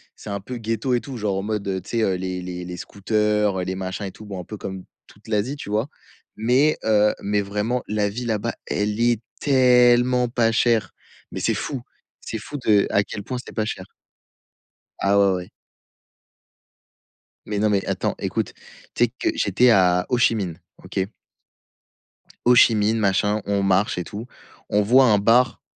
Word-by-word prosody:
c'est - - -10
un 100 0 -3
peu 125 +4 -6
ghetto 115 +3 -2
et 120 - +2
tout 135 -3 -7
genre, 100 -3 -1
en 95 - -2
mode, 100 -3 -2
tu - - -13
sais, 115 -1 0
heu, 95 - +1
les 90 0 -4
les 90 0 -6
les 90 0 -7
scooters, 105 0 0
heu, - - -1
les 95 +1 -3
machins 95 +1 -4
et - - -7
tout 110 - -13
bon, 100 -3 -6
un - - -6
peu 105 +5 -8
comme 95 -2 -6 0.2
toute 105 +3 -20
l'Asie, 110 +6 -1
tu 120 - -8
vois? 110 +5 0 0.5
Mais 130 +7 +2
heu, 105 -1 +3
mais 105 0 0
vraiment, 105 +5 -2
la 105 -1 0
vie 120 +4 -5
là-bas 115 0 -1
elle 105 +1 -2
est 120 -1 +2 0.2
tellement 125 -2 +4
pas 115 -2 +2
chère, 115 -1 +2 0.4
mais - - -5
c'est - - +1
fou, 135 -5 -4 0.4
c'est 110 - -5
fou 145 +7 -7
de 105 -2 +4
à 100 - +2
quel 100 0 -7
point 125 +3 -4
c'est - - -12
pas 110 -1 -1
cher. 95 -4 -5 1.2
Ah 100 +1 +3
ouais, 100 -1 +4
ouais. 90 0 -6 2.0
Mais 105 -1 -2
non, 110 - +2
mais 100 -2 +1
attends - - -1
écoute, - - -2 0.4
tu - - +3
sais - - -4
que - - +1
j'étais 105 +6 +3
à 90 -4 +4
Hô-Chi-Minh. 110 -8 +1 0.2
OK? 95 +1 -2 1.4
Hô-Chi-Minh, 115 -3 +5
machin, 105 +1 +1
on 100 -1 0
marche 95 +1 +2
et 90 - -2
tout, 105 +6 -7 0.4
on 105 - +3
voit 125 +6 +5
un 110 -4 +4
bar, 115 +5 +3
105 Hz, 180 wpm, -23 LUFS, 100-120 Hz, 2.0 s, Hô-Chi-Minh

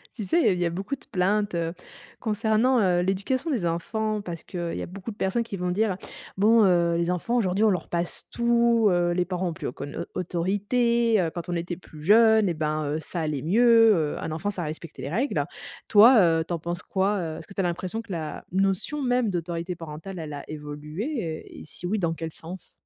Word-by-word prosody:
Tu 220 - -5
sais, 195 - +2
il - - +2
y - - +6
a - - +3
il 180 - -3
y 175 - +1
a - - +1
beaucoup 195 +10 -3
de - - -20
plaintes, 200 +2 +1
heu, 165 0 -1 0.5
concernant, 225 +3 +2
heu, 180 -4 +3
l'éducation 200 - -1
des 230 -11 0
enfants 215 +6 -1
parce 170 -4 -7
qu'il 175 -2 -4
y - - -4
a - - -3
beaucoup 195 +4 -7
de - - -11
personnes 190 +5 0
qui 210 -3 -6
vont 180 0 -2
dire: 200 0 +1 0.4
«Bon 220 +3 +5
heu, 170 -3 +3
les 170 +1 +1
enfants 180 +7 -1
aujourd'hui 205 -2 +2
on - - +5
leur 185 -3 -1
passe 170 0 -2
tout, 235 -1 +3
heu, 175 -1 +2
les 180 0 +1
parents 180 0 -2
ont 165 - -4
plus 165 -3 -5
aucune, 140 +4 -5
au - - -1
autorité, 210 +6 +1
heu, 165 - 0
quand 175 0 -5
on 175 - -1
était 170 +1 -3
plus 160 -3 -14
jeunes 220 +4 +5
et 175 - +1
ben 155 -1 -1
heu, - - -1
ça 170 - -5
allait 150 -4 -2
mieux, 225 - +5 0.2
heu, - - -6
un - - -4
enfant 165 +6 -2
ça 190 -4 -3
respectait 155 -2 -7
les 135 - -4
règles». 240 - 0 0.5
Toi, 230 +5 +8
heu, 165 -2 +3
tu - - -3
en 170 - -2
penses 175 +2 -4
quoi, 195 +2 0
heu, 160 -3 -4
est-ce 160 - -11
que - - -12
tu - - -7
as - - +2
l'impression 180 +5 -2
que 225 -4 -8
la 160 -3 -5
notion 195 +10 0
même 245 -3 +1
d'autorité 175 0 -3
parentale, 165 +3 -8
elle 155 -2 -6
a 145 - -8
évolué 155 - -5
et - - -10
si 165 - -9
oui, 210 +4 0
dans 170 -3 0
quel 165 -1 -5
sens? 175 +4 -10
185 Hz, 235 wpm, -26 LUFS, 170-220 Hz, 0.5 s, Toi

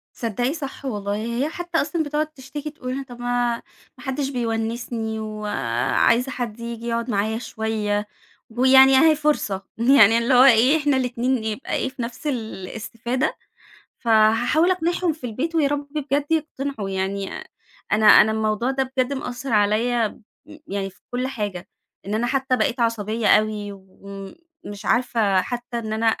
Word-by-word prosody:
تصدّقي 245 +4 -1
صح 280 -3 -7
والله. 205 -5 -2
هي 235 +6 -2
حتى 345 0 -2
أصلًا 320 +2 -1
بتقعُد 300 +1 -1
تشتكي، 290 0 -8
تقول 255 -4 -6
لنا 275 +1 -4
طب 245 -2 -12
ما 245 -1 0 0.4
ما - - -13
حدش 270 0 -2
بيونِّسني 225 -2 -3
و 215 -1 -6 0.6
عايزة 250 +3 +3
حد 235 -3 -5
ييجي 235 0 -6
يقعُد 235 +1 -2
معايا 220 +1 0
شويّة، 215 -3 -2 0.4
ويعني 265 +3 +6
أهي 315 +3 +6
فرصة، 290 -10 0
يعني 230 -2 +6
اللي 235 +3 +1
هو 250 0 +8
إيه 260 +3 +6
إحنا 290 -3 +1
الإتنين 250 -1 0
يبقى 220 +4 -4
إيه، - - -1
في 260 -1 -8
نفْس 235 +5 -5
الاستفادة، 230 +1 -3 0.6
فهاحاول 230 +9 +3
أقنعهم 350 -1 0
في 300 -4 -13
البيت، 260 +9 -3
ويارب 290 -2 0
بجَد 290 -1 -1
يقتنعوا 280 -9 -2
يعني، 195 +1 -2 0.6
أنا 215 +1 +3
أنا 210 +1 +8
الموضوع 220 +3 0
ده 265 -1 -2
بجد 255 +1 +1
مأثَّر 250 -1 -5
عليَّ 210 +3 +3 0.8
يعني 195 -1 -3
في 190 - -25
كل 250 +1 -2
حاجة، 205 -8 -5 0.4
إن 205 - -2
أنا 230 +2 0
حتى 265 0 +1
بقيت 240 +2 0
عصبيّة 225 -1 0
أوي، 210 -1 +2
وم 195 0 -11 0.3
مش 205 0 -8
عارفة 220 -6 +2
حتى 240 -1 -5
إن 220 -2 -5
أنا 220 +1 0
240 Hz, 155 wpm, -22 LUFS, 215-270 Hz, 0.8 s, هو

